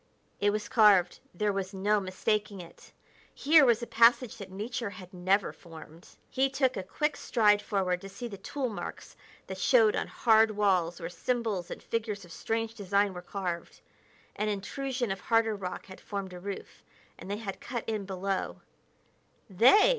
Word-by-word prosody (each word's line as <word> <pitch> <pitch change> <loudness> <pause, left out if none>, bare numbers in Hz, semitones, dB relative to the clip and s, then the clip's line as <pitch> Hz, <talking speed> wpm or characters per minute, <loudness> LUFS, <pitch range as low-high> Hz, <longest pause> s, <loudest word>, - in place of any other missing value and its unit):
It 205 - +3
was 210 +1 -2
carved; 205 -6 +5
there 205 +3 0
was 195 0 -4
no 205 +2 +2
mistaking 200 +2 -1
it! 170 -2 -13 0.4
Here 305 +1 +6
was 235 -2 +3
a - - -2
passage 235 +1 +4
that 200 -2 -9
nature 220 +3 -4
had 185 -1 -12
never 185 +2 +1
formed. 165 0 -13 0.2
He 270 +1 +2
took 265 -1 +1
a - - -2
quick 295 +11 -1
stride 210 -3 +3
forward 185 -3 -1
to 195 - -8
see 240 +5 -7
the 200 -4 -9
tool 280 -3 -3
marks 210 - -7 0.3
that - - -7
showed 460 -3 +4
on - - -1
hard 225 -1 +4
walls 180 -5 +2
where 165 - -4
symbols 205 0 -2
and - - -8
figures 215 -4 -3
of 175 - -16
strange 225 +6 -2
design 200 -2 +1
were 180 - -7
carved. 180 -2 -5 0.6
An 210 0 -1
intrusion 245 +3 -3
of 195 - -3
harder 225 -1 +2
rock 185 -2 -6
had 185 -1 -12
formed 195 -3 -5
a 180 - -8
roof, 195 +1 -7 0.4
and - - -9
they 205 - -2
had 205 -3 -6
cut 240 -2 -4
in 215 -3 -2
below 190 0 -3 0.9
"They!" 250 - +6
205 Hz, 175 wpm, -29 LUFS, 190-230 Hz, 0.9 s, Here